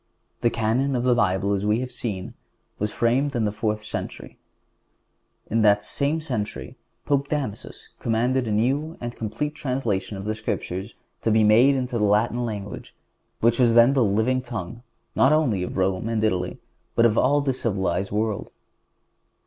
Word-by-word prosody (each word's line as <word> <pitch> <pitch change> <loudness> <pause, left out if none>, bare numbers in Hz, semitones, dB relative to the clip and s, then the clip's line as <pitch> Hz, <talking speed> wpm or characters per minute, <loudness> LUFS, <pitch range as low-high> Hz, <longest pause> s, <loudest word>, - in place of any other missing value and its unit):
The 120 - +3
Canon 120 +5 0
of 120 - 0
the 125 -1 +4
Bible, 100 -3 +1
as 100 0 -1
we 105 +2 +2
have 130 -1 -5
seen, 100 -6 -5 0.5
was 105 +1 -1
framed 130 +6 +1
in 115 -2 +1
the 105 - 0
fourth 105 0 -2
century. - - -6 1.1
In 115 +1 +1
that 105 -1 +4
same 150 +3 -1
century 125 -9 -4 0.3
Pope 140 -1 +1
Damasus 135 -9 -5
commanded 120 +2 0
a - - -1
new 135 +9 0
and 120 0 -5
complete 115 +7 -3
translation 120 -9 -2
of 95 - -7
the 110 - -1
Scriptures 105 -1 -4 0.3
to - - 0
be 110 0 +4
made 120 +6 +6
into 125 -2 -2
the - - +1
Latin 110 +4 +2
language, 105 -3 -6 0.5
which 115 +1 +3
was 120 -2 +4
then 120 +3 +7
the 135 -3 +3
living 110 +5 +1
tongue 115 -2 -6 0.3
not 135 - +5
only 130 -12 +2
of 90 - -4
Rome 95 +3 0
and 110 -2 0
Italy, 90 -4 0 0.4
but 115 - +4
of 115 - +4 0.3
the 135 - +2
civilized 95 -6 -1
world. 105 0 -1
115 Hz, 165 wpm, -24 LUFS, 105-125 Hz, 1.1 s, then